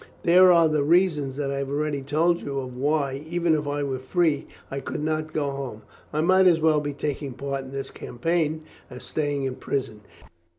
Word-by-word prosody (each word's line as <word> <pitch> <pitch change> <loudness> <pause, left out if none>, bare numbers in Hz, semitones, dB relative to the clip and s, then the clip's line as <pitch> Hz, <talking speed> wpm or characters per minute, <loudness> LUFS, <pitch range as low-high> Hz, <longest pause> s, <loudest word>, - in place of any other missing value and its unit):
There 180 +2 +7
are 170 -2 +6
the 155 -1 +1
reasons 150 -4 +2
that 140 -1 -2
I 140 - -2
have 140 -1 -3
already 145 0 -1
told 160 +5 +1
you 140 -1 -4
of 130 -2 -5
why, 140 0 0
even 170 -1 +1
if 150 -2 -1
I 145 0 -1
were 135 -2 -2
free, 155 +2 0 0.2
I 135 - -3
could 145 - -5
not 155 0 -1
go 145 -2 -1
home. 130 -6 -6 0.3
I 155 - 0
might 185 +3 +5
as 170 -2 +5
well 155 -1 +3
be 145 0 -3
taking 140 -1 -4
part 135 +1 -4
in 130 - -10
this 135 0 -5
campaign 155 +4 -2 0.3
as 125 0 -8
staying 145 -2 -2
in 130 -1 -3
prison. 120 -6 -3
145 Hz, 205 wpm, -25 LUFS, 135-160 Hz, 0.3 s, There